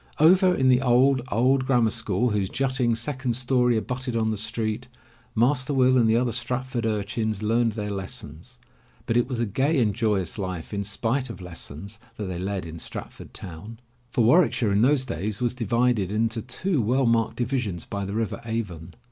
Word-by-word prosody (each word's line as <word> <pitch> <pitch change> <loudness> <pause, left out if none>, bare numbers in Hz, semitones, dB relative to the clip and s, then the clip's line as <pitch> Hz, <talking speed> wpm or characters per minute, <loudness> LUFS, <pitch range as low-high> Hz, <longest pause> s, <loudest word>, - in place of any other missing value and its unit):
Over 180 +4 +6
in 130 -4 +3
the 125 0 +5
old, 130 +1 +4
old 130 +4 +2
grammar 120 -4 +3
school, 110 0 0
whose 100 -3 0
jutting 130 -3 0
second 130 0 -2
story 125 -1 +2
abutted 125 +2 -3
on 110 -1 +1
the - - -1
street. 110 +3 -2 0.5
Master 130 +4 +2
Will 130 -1 +4
and 115 -3 +4
the 110 - +4
other 120 0 +1
Stratford 125 0 -2
ur 105 -2 0
chins 110 0 -3
learned 115 +1 +2
their 105 -1 -4
lessons, 95 - -7 0.5
but 115 - -1
it 120 0 +3
was 125 -3 -3
a 120 - +1
gay 135 +8 +1
and 110 -4 +2
joyous 105 -3 -1
life, 95 -2 -5
in 100 0 -1
spite 115 +6 -1
of 115 - -8
lessons, 90 +3 -8 0.2
that 105 - -5
they 90 -2 -4
led 95 -1 -3
in 80 0 -8
Stratford - - -8
town. 95 +6 -9 0.3
For 120 - +1
Warwick 155 +9 +5
shire 110 -4 0
in 100 +1 +3
those 130 +2 +3
days 100 - -3
was 120 -1 0
divided 115 -4 +1
into 115 +2 0
two 145 - -1
well 125 +5 +2
marked 115 -1 +2
divisions 120 -8 -2
by 100 0 -4
the 100 +1 -4
river 115 -1 -2
Avon. 95 -8 -5
115 Hz, 190 wpm, -25 LUFS, 105-125 Hz, 0.5 s, Over